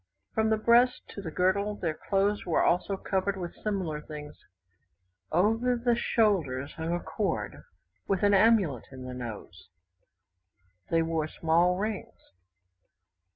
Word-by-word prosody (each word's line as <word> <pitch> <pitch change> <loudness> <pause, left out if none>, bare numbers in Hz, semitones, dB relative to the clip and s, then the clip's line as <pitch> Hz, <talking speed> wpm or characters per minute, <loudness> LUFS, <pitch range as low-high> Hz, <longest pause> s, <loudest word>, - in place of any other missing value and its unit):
From 220 0 +2
the 220 - +3
breast 235 +3 +3
to 200 - -7
the 175 - -5
girdle 195 +5 +1
their 165 -5 -2
clothes 200 +5 0
were 170 - +1
also 190 +3 +1
covered 195 +1 -1
with 175 -2 -5
similar 185 -8 -3
things, 150 -1 -9 1.0
over 225 +8 +2
the 240 0 +1
shoulders 170 - +1
hung 160 +1 -4
a 175 - 0
cord 165 +3 -3 0.4
with 195 0 0
an 205 0 +5
amulet 195 - +4
in 130 -1 -9
the 130 0 -6
nose, 105 -6 -8 1.2
they 165 0 +3
wore 160 -1 -1
small 170 +3 +2
rings. 210 +1 -4
185 Hz, 135 wpm, -28 LUFS, 160-210 Hz, 1.2 s, an